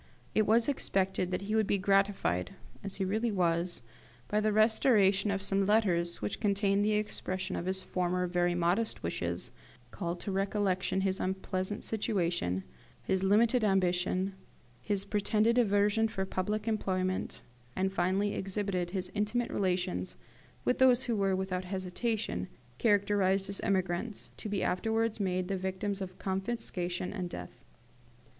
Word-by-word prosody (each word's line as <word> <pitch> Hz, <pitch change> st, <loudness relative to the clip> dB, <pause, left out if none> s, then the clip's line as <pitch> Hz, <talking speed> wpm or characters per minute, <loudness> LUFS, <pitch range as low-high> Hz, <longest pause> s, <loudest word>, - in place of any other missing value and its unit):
It 215 Hz, -, +3 dB
was 225 Hz, +2 st, +4 dB
expected 190 Hz, -9 st, 0 dB
that 185 Hz, +1 st, -2 dB
he 210 Hz, +2 st, -3 dB
would 220 Hz, -2 st, +2 dB
be 200 Hz, -, +2 dB
gratified, 195 Hz, -, +1 dB, 0.3 s
as 200 Hz, -1 st, -5 dB
he 195 Hz, -, -1 dB
really 220 Hz, +4 st, 0 dB
was, 175 Hz, -, 0 dB, 0.5 s
by 210 Hz, -, +2 dB
the 215 Hz, 0 st, +2 dB
restoration 215 Hz, -2 st, +4 dB
of 195 Hz, -1 st, -1 dB
some 195 Hz, 0 st, +1 dB
letters 175 Hz, -, +2 dB
which 105 Hz, -, -2 dB
contained 200 Hz, 0 st, +2 dB
the 215 Hz, +1 st, +2 dB
expression 190 Hz, -3 st, -2 dB
of 175 Hz, -, -3 dB
his 190 Hz, 0 st, -1 dB
former 180 Hz, 0 st, 0 dB
very 175 Hz, 0 st, +1 dB
modest 175 Hz, +6 st, 0 dB
wishes, 85 Hz, +6 st, -2 dB, 0.4 s
called 170 Hz, +10 st, -4 dB
to 200 Hz, -, -3 dB
recollection 195 Hz, -1 st, 0 dB
his 190 Hz, 0 st, 0 dB
unpleasant 190 Hz, +1 st, -2 dB
situation, 175 Hz, -, -1 dB, 0.4 s
his 190 Hz, -1 st, 0 dB
limited 220 Hz, +5 st, +4 dB
ambition, 185 Hz, -1 st, +1 dB, 0.5 s
his 200 Hz, -2 st, -1 dB
pretended 215 Hz, +3 st, +2 dB
aversion 210 Hz, 0 st, +3 dB
for 195 Hz, -3 st, -3 dB
public 210 Hz, +3 st, -2 dB
employment, 185 Hz, -4 st, -1 dB, 0.3 s
and 190 Hz, +1 st, 0 dB
finally 195 Hz, +3 st, +1 dB
exhibited 195 Hz, -2 st, -2 dB
his 185 Hz, 0 st, -4 dB
intimate 215 Hz, +3 st, 0 dB
relations 180 Hz, -, -1 dB, 0.5 s
with 250 Hz, -, +1 dB
those 260 Hz, -1 st, +5 dB
who 235 Hz, -, 0 dB
were, 195 Hz, -2 st, +2 dB
without 185 Hz, -1 st, -2 dB
hesitation, 185 Hz, -, -2 dB, 0.3 s
characterised 200 Hz, -2 st, +2 dB
as 200 Hz, -, -1 dB
emigrants, 190 Hz, +3 st, -1 dB
to 215 Hz, -, -6 dB
be 200 Hz, -1 st, -1 dB
afterwards 220 Hz, +4 st, 0 dB
made 185 Hz, -2 st, 0 dB
the 195 Hz, -, -1 dB
victims 190 Hz, +2 st, -3 dB
of 185 Hz, -1 st, -6 dB
confiscation 190 Hz, -3 st, -3 dB
and 185 Hz, -4 st, -3 dB
death. -, -, -7 dB
195 Hz, 145 wpm, -31 LUFS, 185-210 Hz, 0.5 s, those